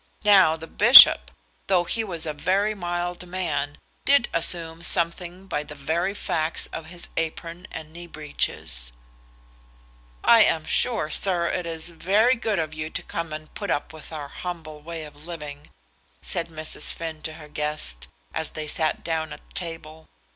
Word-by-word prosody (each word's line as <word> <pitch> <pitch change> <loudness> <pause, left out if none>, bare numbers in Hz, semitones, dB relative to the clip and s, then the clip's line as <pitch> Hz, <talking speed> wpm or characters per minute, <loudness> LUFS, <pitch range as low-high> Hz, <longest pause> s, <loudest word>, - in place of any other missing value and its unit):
Now 195 -6 +6
the 160 0 -9
bishop, 65 - +9 0.4
though 185 -2 +3
he 225 +6 -2
was 170 -6 -2
a 155 - -3
very 195 +7 0
mild 175 -1 -4
man, 155 -6 -3 0.3
did 280 -3 +4
assume 165 -1 +4
something 175 +2 +1
by 165 -6 -2
the 150 0 -10
very 170 +7 -2
facts 160 -4 -1
of 160 - -6
his 175 +1 -3
apron 165 +2 -4
and 160 -1 -9
knee 175 +1 -9
breeches. - - -4 1.3
"I 230 -2 +7
am 160 -5 +1
sure, 225 -10 +1
sir, 180 -2 +2
it 180 -1 -3
is 165 0 -3
very 200 +8 +2
good 220 -3 -2
of 155 -1 -2
you 155 0 -5
to - - -4
come 165 -1 -5
and 155 0 -8
put 200 - -5
up 145 +1 -2
with 160 0 -11
our 150 -3 -6
humble 160 -4 -7
way 165 +1 -7
of 150 +1 -12
living," 150 -4 -8 0.5
said 170 -1 -2
Mrs. 155 -1 -2
Finn 160 -2 -6
to 155 +1 -5
her 155 -1 -12
guest, 150 - -4 0.3
as 160 - -2
they 155 -1 -6
sat 155 +1 -1
down 160 -2 -2
at - - -12
table. 160 -2 -7
165 Hz, 165 wpm, -24 LUFS, 155-175 Hz, 1.3 s, bishop